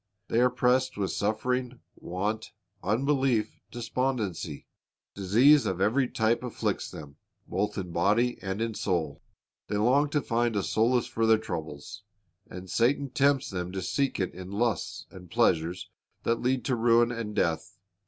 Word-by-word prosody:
They 115 - +2
are 125 +1 +5
pressed 130 -1 +1
with 100 -2 -1
suffering, 125 +4 -1 0.2
want, 105 +5 -3 0.3
unbelief, 125 0 +1
despondency. 115 - -3 0.5
Disease 120 +10 +5
of 95 -1 -2
every 120 +7 +2
type 115 0 +1
afflicts 125 -2 -2
them, 75 -2 -10 0.3
both 105 +2 -1
in 90 -3 -4
body 105 +9 +2
and 95 +2 -2
in 115 -1 -2
soul. 85 -8 -2 0.5
They 105 - -1
long 130 +7 +3
to 145 0 +1
find 120 -1 0
a 100 - +1
solace 120 +3 +2
for 115 0 0
their 110 0 +6
troubles, 80 -1 -6 0.5
and 90 +1 -8
Satan 130 +7 +1
tempts 140 -1 +2
them 90 -1 -4
to 95 -1 -3
seek 135 +8 0
it 95 - -1
in 90 +1 -8
lusts 110 -2 -1
and 90 -2 -12
pleasures 90 -5 +1 0.3
that 115 0 0
lead 125 +1 0
to 130 - +1
ruin 120 0 +4
and 115 -3 -5
death. 80 -4 -1
110 Hz, 155 wpm, -28 LUFS, 95-125 Hz, 0.5 s, their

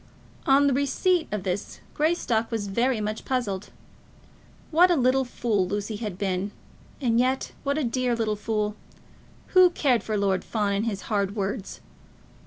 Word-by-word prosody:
On 280 +1 +5
receipt 315 +6 +1
of 210 -3 -2
this, 185 +2 -3
Greystock 295 -8 +1
was 225 -3 -2
very 235 +4 +1
much 215 +1 -3
puzzled. 210 -7 -2 1.0
What 350 +3 +6
a 350 - +4
little 260 -1 +3
fool 220 -6 0
Lucy 205 +2 -3
had 210 -5 -5
been, 190 0 -1 0.5
and 235 -4 +2
yet 260 +2 +1
what 280 +1 -1
a 310 - 0
dear 250 0 0
little 220 -2 0
fool! 210 0 -2 0.7
Who 370 -1 +7
cared 270 -8 +2
for 215 -1 -2
Lord 195 -2 +1
Fawn 205 -3 -1
and 200 +2 0
his 200 -3 -3
hard 200 -2 -1
words? 200 0 -4
225 Hz, 155 wpm, -26 LUFS, 205-265 Hz, 1.0 s, Who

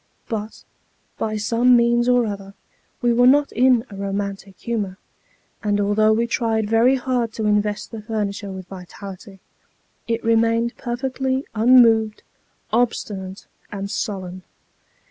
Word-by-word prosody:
But, 215 -1 -5 0.6
by 215 -1 -2
some 235 +4 +3
means 240 +1 +2
or 245 -1 +4
other, 200 -2 -6 0.5
we 240 -1 +3
were 245 +1 +5
not 285 +2 +4
in 250 0 +3
a - - -8
romantic 195 0 -4
humour; 205 -5 -3 0.6
and 205 -1 0
although 205 +2 +3
we 225 +2 +2
tried 225 -2 0
very 230 +4 +4
hard 245 -3 -1
to 220 - -3
invest 210 0 0
the 225 -2 -7
furniture 205 -2 -3
with 190 -1 -8
vitality, 195 +1 -10 0.7
it 230 0 -2
remained 230 +1 +2
perfectly 260 +2 -2
unmoved, 225 -2 +4 0.5
obstinate, 205 -5 -2 0.3
and 200 -1 -5
sullen. 185 -3 -4
220 Hz, 125 wpm, -21 LUFS, 200-240 Hz, 0.7 s, were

